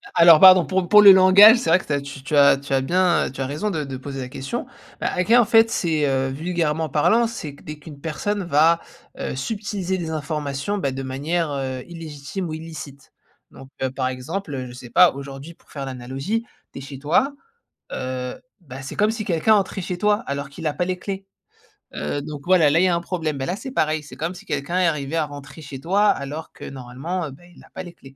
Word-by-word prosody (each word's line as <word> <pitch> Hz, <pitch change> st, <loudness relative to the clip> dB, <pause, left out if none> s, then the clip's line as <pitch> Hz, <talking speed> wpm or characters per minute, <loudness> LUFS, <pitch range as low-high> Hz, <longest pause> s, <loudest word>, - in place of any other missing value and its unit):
Alors 170 Hz, -2 st, +8 dB
pardon 185 Hz, -2 st, +8 dB
pour 185 Hz, -2 st, -1 dB
pour 210 Hz, +2 st, +7 dB
le 200 Hz, -1 st, +10 dB
langage, 195 Hz, +5 st, +8 dB
c'est 235 Hz, -, -2 dB
vrai 175 Hz, +3 st, +5 dB
que -, -, -10 dB
tu 150 Hz, -, -2 dB
as 140 Hz, -, 0 dB
tu 140 Hz, +1 st, -6 dB
as 140 Hz, -1 st, +6 dB
tu 140 Hz, 0 st, -6 dB
as 135 Hz, -, +3 dB
bien, 180 Hz, +4 st, +2 dB
heu, -, -, -7 dB
tu 135 Hz, -, -7 dB
as -, -, -1 dB
raison 150 Hz, +10 st, -3 dB
de 155 Hz, -6 st, -2 dB
de 135 Hz, -2 st, -6 dB
poser 135 Hz, 0 st, -7 dB
la 125 Hz, -, -6 dB
question. 135 Hz, 0 st, -5 dB, 0.4 s
Bah, -, -, 0 dB
hacker 225 Hz, +7 st, +4 dB
en -, -, +1 dB
fait 225 Hz, 0 st, +5 dB
c'est, 160 Hz, -7 st, 0 dB
heu, 135 Hz, 0 st, 0 dB
vulgairement 160 Hz, +1 st, -1 dB
parlant, 225 Hz, -, +3 dB
c'est 155 Hz, -11 st, -7 dB
que -, -, -19 dB
dès 155 Hz, -, -7 dB
qu'une 145 Hz, -1 st, -12 dB
personne 195 Hz, +6 st, -3 dB
va, 165 Hz, +1 st, +3 dB, 0.4 s
heu, -, -, -4 dB
subtiliser 195 Hz, -, -3 dB
des 165 Hz, -2 st, -4 dB
informations, 150 Hz, +3 st, -3 dB
bah, 140 Hz, -8 st, -1 dB
de 135 Hz, 0 st, -5 dB
manière, 150 Hz, +5 st, -2 dB
heu, 130 Hz, -2 st, -4 dB
illégitime 165 Hz, +2 st, -6 dB
ou -, -, -5 dB
illicite. 155 Hz, -3 st, -9 dB, 0.4 s
Donc, 135 Hz, -, -13 dB
heu, 130 Hz, -, +1 dB
par 130 Hz, -1 st, -2 dB
exemple, 145 Hz, +7 st, -5 dB
heu, 130 Hz, -1 st, -5 dB
je 120 Hz, -, -10 dB
sais 125 Hz, -1 st, -11 dB
pas 180 Hz, -1 st, +6 dB
aujourd'hui 140 Hz, +3 st, -9 dB
pour -, -, -30 dB
faire 140 Hz, -2 st, -5 dB
l'analogie, 135 Hz, -, -4 dB, 0.3 s
tu -, -, -9 dB
es -, -, -9 dB
chez 135 Hz, 0 st, -9 dB
toi, 175 Hz, -, +1 dB, 0.6 s
heu, 130 Hz, -1 st, -4 dB, 0.3 s
bah, 135 Hz, -5 st, -10 dB
c'est 135 Hz, -, -8 dB
comme 210 Hz, +1 st, +3 dB
si 220 Hz, -2 st, -4 dB
quelqu'un 180 Hz, +5 st, +3 dB
entrait 195 Hz, -1 st, 0 dB
chez 180 Hz, 0 st, -4 dB
toi 210 Hz, +1 st, +3 dB
alors 140 Hz, 0 st, -4 dB
qu'il 160 Hz, +3 st, -8 dB
a 150 Hz, -, 0 dB
pas 180 Hz, -, -1 dB
les 180 Hz, 0 st, -3 dB
clés. 195 Hz, 0 st, -6 dB, 0.7 s
Heu, 110 Hz, -, -3 dB
donc 145 Hz, -1 st, -7 dB
voilà, 180 Hz, -5 st, +5 dB
là 160 Hz, +4 st, +3 dB
il -, -, +4 dB
y -, -, +4 dB
a 170 Hz, -, +2 dB
un -, -, 0 dB
problème, 165 Hz, -5 st, -3 dB
bah, 135 Hz, -, -3 dB
là 180 Hz, -, -2 dB
c'est 265 Hz, +5 st, -8 dB
pareil, 155 Hz, -7 st, 0 dB
c'est -, -, -12 dB
comme 170 Hz, +3 st, -3 dB
si -, -, -13 dB
quelqu'un 145 Hz, +5 st, -2 dB
est 180 Hz, -, +4 dB
arrivé 150 Hz, -1 st, -2 dB
à 160 Hz, -, +1 dB
rentrer 145 Hz, +1 st, -11 dB
chez 140 Hz, -2 st, -8 dB
toi 195 Hz, +7 st, +2 dB
alors 145 Hz, +3 st, -3 dB
que -, -, -11 dB
normalement, 135 Hz, +7 st, -5 dB
heu, -, -, -9 dB
bah, 140 Hz, +6 st, -15 dB
il 175 Hz, -, -18 dB
a -, -, -19 dB
pas -, -, -6 dB
les 175 Hz, -1 st, -11 dB
clés. 135 Hz, -4 st, -16 dB
155 Hz, 245 wpm, -22 LUFS, 140-180 Hz, 0.7 s, le